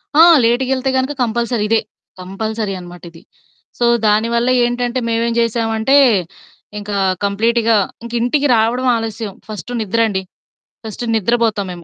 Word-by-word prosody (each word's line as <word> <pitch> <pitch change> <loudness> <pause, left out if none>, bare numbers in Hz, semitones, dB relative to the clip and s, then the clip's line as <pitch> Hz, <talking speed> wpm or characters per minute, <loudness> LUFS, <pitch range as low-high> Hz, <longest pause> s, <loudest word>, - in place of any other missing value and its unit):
ఆ! 315 - +7 0.2
లేటుగెళ్తే 260 +2 0
గనుక 260 +2 -1
కంపల్సరీ 235 -1 -1
ఇదే. 225 - +3 0.4
కంపల్సరీ 210 +2 -4
అనమాట 175 0 -12
ఇది. 165 - -16 0.6
సో, 240 - +2 0.2
దానివల్ల 230 +3 +1 0.2
ఏంటంటే 245 +1 -2
మేమేం 230 +1 0
చేశామంటే 225 +2 +1 0.8
ఇంకా 205 0 -5 0.3
కంప్లీట్‌గా 225 +3 +1 0.3
ఇంక 235 - -8
ఇంటికి 280 +4 +1
రావడం 235 +3 +1
ఆలస్యం 220 -2 -5
ఫస్టు 215 +2 -8
నిద్రండి. 215 -1 0 0.6
ఫస్టు 220 +2 -6
నిద్రబోతాం 220 -1 0
మేము. 175 -1 -9
230 Hz, 120 wpm, -17 LUFS, 210-240 Hz, 0.8 s, ఆ